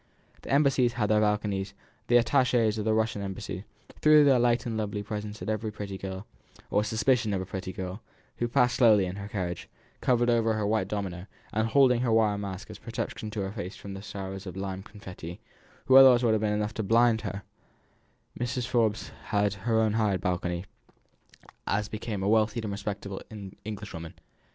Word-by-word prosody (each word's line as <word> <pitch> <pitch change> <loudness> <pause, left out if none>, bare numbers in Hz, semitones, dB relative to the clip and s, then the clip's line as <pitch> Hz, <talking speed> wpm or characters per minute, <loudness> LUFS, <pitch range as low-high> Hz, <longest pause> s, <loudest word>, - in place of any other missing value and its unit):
The - - -11
embassies 135 -4 +3
had 110 -3 0
their 105 0 +4
balconies; 105 -2 0 0.3
the 120 - +6
attaches 120 -3 +2
of 105 - -3
the 110 - +2
Russian 110 -2 0
Embassy 95 0 -5 0.4
threw 155 -1 +7
their 135 -3 +5
light 120 0 +2
and 115 -2 -3
lovely 105 -1 -2
presents 105 -1 -5
at - - -7
every 110 0 -2
pretty 100 -2 -6
girl, 95 +1 -6 0.5
or 105 - +3
suspicion 110 0 +1
of 95 - -1
a - - -4
pretty 95 -1 -5
girl, 95 +3 -6 0.4
who 120 - 0
passed 125 0 +2
slowly 110 -6 +5
in 90 +2 -5
her 100 0 -6
carriage, 90 -4 -4 0.3
covered 120 -1 +2
over 115 -1 +3
with 110 - +1
her 105 - -1
white 105 -2 +1
domino, 95 -3 -4 0.3
and 110 +1 +1
holding 125 0 +4
her 125 -2 +1
wire 110 -2 +3
mask 100 0 -6
as - - -10
a - - -30
protection 115 -1 -5
to 105 -1 -4
her 95 0 -3
face 100 -3 -6
from 100 - -8
the 95 - -7
showers 95 -1 -7
of 90 - -7
lime 95 -1 -4
confetti, 95 -5 -9 0.5
which 130 0 +8
otherwise 130 -2 +8
would 115 -2 +4
have 110 - +1
been 105 -1 +1
enough 105 0 -1
to 110 - -3
blind 115 +2 +3
her; 100 -1 -5 1.0
Mrs. 125 0 -2
Forbes 115 -3 0
had 105 -2 +1
her 110 +3 0
own 110 -1 +2
hired 105 -4 +1
balcony, 90 0 -2 1.0
as 105 +1 0
became 105 -2 -4
a - - 0
wealthy 110 +1 +2
and 105 - -3
respectable 100 -1 -5 0.4
Englishwoman. 100 -6 -7
105 Hz, 195 wpm, -28 LUFS, 100-115 Hz, 1.0 s, which